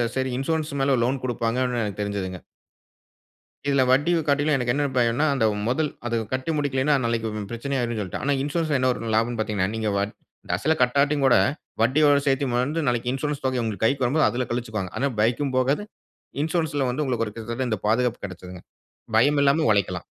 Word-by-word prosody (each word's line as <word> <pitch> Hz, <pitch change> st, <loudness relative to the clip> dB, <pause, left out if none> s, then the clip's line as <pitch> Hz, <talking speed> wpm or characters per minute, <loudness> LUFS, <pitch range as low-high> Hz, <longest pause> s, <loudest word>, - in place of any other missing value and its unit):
சரி 130 Hz, 0 st, 0 dB
இன்சூரன்ஸ் 155 Hz, +3 st, -1 dB
மேல 135 Hz, 0 st, +3 dB
லோன் 130 Hz, +2 st, 0 dB
குடுப்பாங்க 120 Hz, -1 st, -1 dB
அப்டினு 125 Hz, -2 st, -1 dB
எனக்கு 105 Hz, -1 st, -5 dB
தெரிஞ்சதுங்க. 100 Hz, -3 st, -3 dB, 1.3 s
இதுல 140 Hz, -2 st, +4 dB
வட்டியு 145 Hz, +7 st, +3 dB
காட்டியும் 145 Hz, +1 st, +2 dB
எனக்கு 125 Hz, -2 st, 0 dB
என்ன 145 Hz, +2 st, 0 dB
பயம்ன்னா, 120 Hz, +4 st, +2 dB
அந்த 130 Hz, -5 st, +1 dB, 0.2 s
மொதல். 150 Hz, +5 st, +1 dB, 0.2 s
அத 120 Hz, -1 st, 0 dB, 0.2 s
கட்டி 130 Hz, +5 st, -1 dB
முடிக்கலைன்னா, 145 Hz, 0 st, +1 dB
நாளைக்கு 115 Hz, -1 st, -1 dB, 0.2 s
பிரச்சனை 135 Hz, +4 st, -3 dB
ஆயிரும்னு 120 Hz, -2 st, -2 dB
சொல்லிட்டு. 95 Hz, -4 st, -4 dB
ஆனா 145 Hz, +2 st, +2 dB
இன்சூரன்ஸ்ல 150 Hz, +1 st, 0 dB
என்ன 130 Hz, 0 st, +2 dB
ஒரு 115 Hz, -2 st, -5 dB
லாபம்ன்னு 115 Hz, +2 st, +1 dB
பார்த்தீங்கன்னா, 105 Hz, -3 st, 0 dB
நீங்க 110 Hz, -1 st, -1 dB
வட் 100 Hz, +1 st, -1 dB, 0.4 s
அசல 155 Hz, -, +1 dB
கட்டாட்டியுங்கூட 140 Hz, +1 st, +3 dB, 0.5 s
வட்டியோட 145 Hz, +5 st, +4 dB
சேர்த்து 135 Hz, 0 st, +2 dB
வந்து 150 Hz, +6 st, -1 dB
நாளைக்கு, 120 Hz, 0 st, 0 dB
இன்சூரன்ஸ் 145 Hz, +1 st, -3 dB
தொகை 130 Hz, -2 st, 0 dB
உங்க 110 Hz, -3 st, -4 dB
கைக்கு 135 Hz, +3 st, +1 dB
வரும்போது, 150 Hz, +6 st, +3 dB
அதுல 125 Hz, +1 st, -2 dB
கழிச்சுக்வாங்க. 110 Hz, -6 st, -3 dB
ஆனா 140 Hz, -, +1 dB
பைக்கும் 125 Hz, +5 st, +1 dB
போகாது. 130 Hz, +7 st, +2 dB, 0.6 s
இன்சூரன்ஸ்ல 155 Hz, -4 st, 0 dB
வந்து 135 Hz, +5 st, -1 dB
உங்களுக்கு 120 Hz, -4 st, 0 dB
ஒரு 105 Hz, -, -8 dB
கிட்டத்தட்ட 115 Hz, +3 st, -3 dB
இந்த 110 Hz, -3 st, -1 dB
பாதுகாப்பு 120 Hz, +2 st, +1 dB
கெடச்சதுங்க. 90 Hz, -1 st, -9 dB, 0.6 s
பயம் 145 Hz, +5 st, +4 dB
இல்லாம 140 Hz, +3 st, +3 dB
உழைக்கலாம். 100 Hz, -3 st, 0 dB
130 Hz, 170 wpm, -24 LUFS, 115-140 Hz, 1.3 s, இதுல